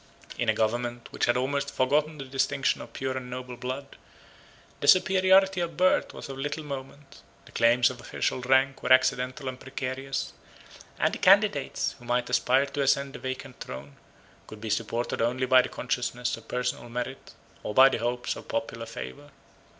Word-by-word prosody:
In - - +1
a - - +5
government 120 +2 -1
which - - 0
had 120 - +2
almost 140 +2 -1
forgotten 150 +4 +1
the 135 - -7
distinction 135 +1 0
of - - -10
pure 130 -1 -3
and 125 -1 -6
noble 125 0 -6
blood, 130 +3 -6 0.8
the - - -3
superiority 190 0 +5
of 170 -3 -4
birth 185 +1 +3
was - - -9
of 135 -1 -7
little 145 +3 -3
moment; 140 0 -9 0.2
the - - -16
claims 120 +2 +4
of 125 -1 -10
official 130 - -2
rank 130 +1 +2
were - - -2
accidental 130 +1 +3
and 130 0 -5
precarious; 135 0 -4 0.6
and - - +1
the - - -4
candidates, 195 -6 +3
who 120 - -14
might 120 0 0
aspire 130 +2 +3
to 140 +1 -4
ascend 140 0 +1
the - - -8
vacant 130 0 -6
throne 70 +2 -8 0.5
could 110 - -10
be 110 0 -4
supported 115 +2 -1
only 125 +3 +1
by 130 0 +6
the 125 - -5
consciousness 125 -1 -2
of 115 0 -15
personal 125 -1 -3
merit, 125 +3 -6 0.3
or 105 - -5
by 130 +1 +9
the 135 - 0
hopes 120 +1 -2
of - - -11
popular 115 0 -4
favor. 140 +5 -8
130 Hz, 180 wpm, -27 LUFS, 120-140 Hz, 0.8 s, by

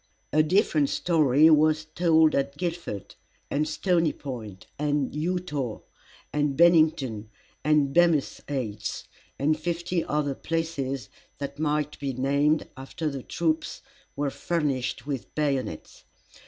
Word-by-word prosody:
A 155 - +5
different 155 -3 +2
story 155 -3 +4
was 155 0 +4
told 160 -1 +3
at 140 +1 -1
Guildford, 170 - -4 0.4
and 150 +2 +1
Stony 170 -4 +1
Point, 110 -9 -8
and 145 -2 0
Eutaw, 150 -6 -2 0.5
and 145 -2 0
Bennington, 155 -10 +3 0.3
and 150 -2 +3
Bemis' 170 -4 +3
Heights, 110 -7 -4 0.3
and 155 +2 +1
fifty 170 +1 -1
other 150 -2 -1
places 140 -7 -3 0.3
that 140 +1 -6
might 150 -1 -1
be 140 -2 -2
named, 140 +4 +1
after 140 +4 -4
the 135 -1 -5
troops 160 +3 -2 0.3
were 145 -1 -1
furnished 145 -9 -2
with 140 -4 -5
bayonets. 135 - -2
150 Hz, 115 wpm, -26 LUFS, 135-160 Hz, 0.5 s, A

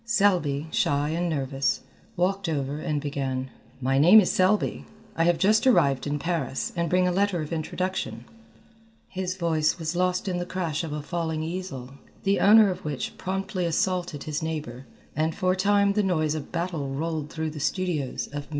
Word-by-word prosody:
Selby, 180 -10 +2
shy 145 +1 +1
and 170 +2 -1
nervous, 135 -3 -1 0.4
walked 190 +1 0
over 145 -1 -2
and 150 -1 -1
began: 135 -3 -3 0.3
"My 135 +1 +1
name 180 +9 +9
is 190 - +2
Selby, 190 +3 +1 0.3
I 165 - +2
have 175 -1 +3
just 215 +7 +3
arrived 140 - +3
in 145 0 -1
Paris, 150 -5 -2
and 170 -1 0
bring 180 +1 +3
a - - +2
letter 195 -1 +1
of 150 - -6
introduction 185 +4 -3 0.5
" 225 0 -30 0.3
His 185 -1 -3
voice 160 -4 +1
was 165 0 -3
lost 180 +1 0
in 180 -2 -1
the 175 - -3
crash 170 -4 -2
of 160 - -5
a 150 0 -4
falling 160 -1 -2
easel, 160 -7 -5 0.3
the 195 0 +2
owner 210 -1 +7
of 180 - -7
which 145 -4 -4
promptly 190 0 -2
assaulted 175 -3 -1
his 155 0 -3
neighbour, 150 -6 -5 0.3
and 155 +2 0
for 185 -2 +1
a - - +1
time 200 +1 +3
the 210 - +2
noise 155 -6 +1
of 155 -2 -6
battle 170 -5 -2
rolled 155 +2 -3
through 160 0 -3
the 150 - -7
studios 160 -3 -1
of 145 -1 -7
MM. - - -25
165 Hz, 185 wpm, -26 LUFS, 150-185 Hz, 0.5 s, name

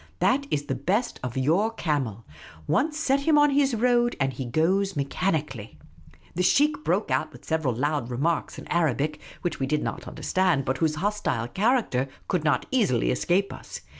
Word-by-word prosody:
That 280 +1 +2
is 145 - 0
the 135 - -2
best 190 - -1
of 125 -2 -5
yonr 175 - +1
camel. 130 - -2 0.4
Once 300 - +1
set 280 -3 +2
him 295 +2 +3
on 295 0 +5
his 275 -3 +2
road, 240 +1 +2
and 135 -1 0
he 130 - -5
goes 185 +9 +1
mechanically. 140 - -2 0.6
The 180 - -1
sheikh 295 +10 +3
broke - - 0
out - - 0
with - - -15
several 160 -7 0
loud 145 -1 -1
remarks 145 +7 -1
in - - -8
Arabic, 155 -2 0 0.2
which 175 - -2
we 135 - -1
did 150 +1 0
not - - -4
understand, 180 -8 0
but 130 0 -1
whose 155 -2 +1
hostile 185 - -1
character 195 - +1 0.2
could 180 -5 0
not 145 -5 +1
easily 200 - +2
escape 180 +9 +1
us. - - -9
165 Hz, 175 wpm, -26 LUFS, 135-225 Hz, 0.6 s, on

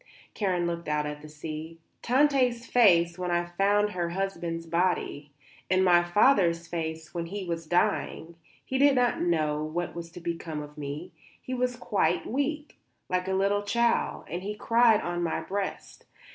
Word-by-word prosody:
Karen 185 -4 0
looked 170 -1 -3
out 150 0 0
at 150 0 -5
the 155 - -11
sea. 155 +2 -7 0.2
"Tante's 255 -2 +2
face 175 -8 +4
when 180 -1 -2
I 175 0 +1
found 200 +4 +1
her 175 -2 -2
husband's 170 -3 -3
body. 165 -4 -1 0.4
And 185 0 +3
my 175 -1 +5
father's 175 -3 +3
face 160 -2 -5
when 170 -1 -3
he 195 +2 -5
was 165 -2 -4
dying; 175 -2 0 0.3
he 265 - -2
did 280 0 +5
not 245 -1 +2
know 155 -3 +1
what 170 +3 -3
was 170 -1 -7
to - - -8
become 165 -3 -4
of 150 0 -12
me; 145 0 -6 0.3
he 255 - -6
was 250 0 0
quite 180 -8 0
weak, 295 +4 -3 0.3
like 180 0 0
a 190 - 0
little 200 +2 +2
child, 235 +3 +1
and 175 - -4
he 205 +2 -4
cried 230 0 +4
on 175 0 -3
my 170 -2 -1
breast. 200 0 -5
175 Hz, 170 wpm, -28 LUFS, 165-205 Hz, 0.4 s, my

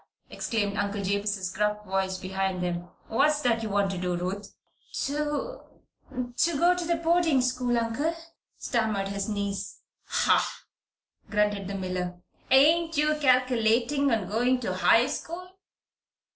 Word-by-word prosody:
exclaimed 205 -3 -2
Uncle 200 0 -1
Jabez's 200 -1 -1
gruff 210 +1 -1
voice 190 -1 -1
behind 190 0 -2
them. 175 0 -3 0.2
"What's 295 +6 +2
that 235 -3 +1
you 220 - -3
want 200 -1 +1
to 190 - -4
do, 180 -1 -1
Ruth?" 190 +3 -4 0.5
"To 295 - -2 0.8
to 335 -3 +2
go 345 +4 +5
to 345 -1 0
boarding 330 -3 +2
school, 250 -1 0
Uncle," 235 +8 -1 0.4
stammered 215 -5 -1
his 200 +1 -3
niece. 200 -1 -3 0.2
"Hah!" - - +1 0.7
grunted 205 -2 +1
the 200 - -4
miller. 180 -1 -3 0.3
"Ain't 320 +5 +4
you 300 +1 +3
calculatin' 255 0 +3
on 220 -7 0
going 245 +5 +1
to 200 -6 -2
high 225 +5 +4
school?" 360 +6 -5
220 Hz, 130 wpm, -27 LUFS, 195-280 Hz, 0.8 s, go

